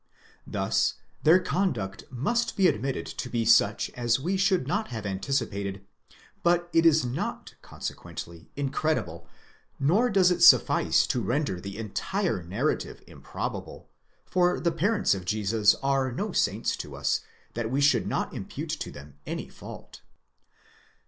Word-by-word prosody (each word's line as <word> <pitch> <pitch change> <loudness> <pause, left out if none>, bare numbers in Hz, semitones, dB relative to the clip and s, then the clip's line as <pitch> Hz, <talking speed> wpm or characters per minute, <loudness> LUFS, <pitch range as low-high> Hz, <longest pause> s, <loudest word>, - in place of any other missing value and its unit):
Thus - - 0 0.3
their 165 +4 +6
conduct 175 - -2
must 190 - -1
be 190 -2 +5
admitted 135 -1 -1
to 125 - -6
be 115 -2 -1
such 110 -2 +4
as 120 0 0
we 175 +8 -1
should 190 -5 +2
not 205 +7 -1
have 110 -3 -6
anticipated; 100 -2 -2 0.6
but 175 0 +2
it 165 0 +5
is 160 -4 +4
not 125 +2 -4
consequently 85 -1 -8
incredible 140 - -2 0.5
nor 190 - +3
does 190 -4 +4
it 175 -1 0
suffice - - +6
to 125 - -1
render 120 -8 -1
the 100 0 -7
entire 115 - -2
narrative 100 - -2
improbable, - - -7 0.3
for 180 -1 +2
the 170 - +1
parents 185 - +2
of 95 -2 -4
Jesus 105 +2 +2
are 135 -1 +1
no 200 - -3
saints 105 - 0
to - - -7
us, - - 0 0.3
that 115 -1 -3
we 135 +3 0
should 145 0 +3
not - - -2
impute - - -5
to - - -4
them 70 0 -13
any - - -4
fault. - - -11
135 Hz, 140 wpm, -27 LUFS, 105-175 Hz, 0.6 s, their